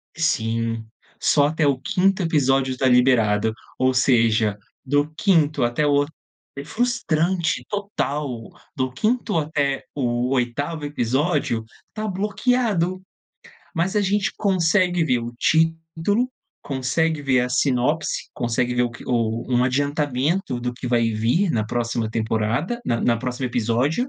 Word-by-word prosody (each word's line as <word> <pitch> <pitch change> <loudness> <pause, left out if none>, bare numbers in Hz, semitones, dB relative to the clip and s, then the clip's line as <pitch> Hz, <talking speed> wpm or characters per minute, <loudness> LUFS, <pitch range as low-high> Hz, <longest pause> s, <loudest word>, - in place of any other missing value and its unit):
sim, 115 -7 -1 0.3
só 145 -1 +3
até 155 0 0
o 135 -2 +2
5º 190 +5 +1
episódio 135 -5 +1
tá 130 - 0
liberado, 115 -4 +3 0.3
ou 130 0 +3
seja, 115 -4 +3 0.3
do 145 +2 +1
5º 155 - +2
até 120 +5 +1
o 145 0 +3 0.5
é 140 - -5
frustrante, 185 -7 0
total. 145 - -3 0.3
Do 130 -1 -1
5º 215 - 0
até 145 -3 -1
o 120 -2 0
8º 140 +5 -2
episódio, 140 -2 0 0.3
tá 215 0 -4
bloqueado. 205 -2 0 0.7
Mas 180 +4 0
a 210 - +4
gente 195 0 +1
consegue 180 -2 +2
ver 125 -4 +2
o 120 0 -5
título, 165 - +1 0.3
consegue 145 +4 -1
ver 130 -2 +3
a 125 - -1
sinopse, 130 +4 0
consegue 120 +1 -1
ver 125 0 +2
o 120 - 0
que 120 - -11
o 115 -2 0
um 125 0 +3
adiantamento 145 +2 0
do 125 0 -2
que 125 - -7
vai 115 -2 +2
vir 120 - +1
na 110 -2 0
próxima 115 -1 -1
temporada 115 - -1
na 115 -1 0
na 120 -1 +2
próxima 125 +2 -3
episódio, 125 - 0
140 Hz, 135 wpm, -22 LUFS, 120-165 Hz, 0.7 s, a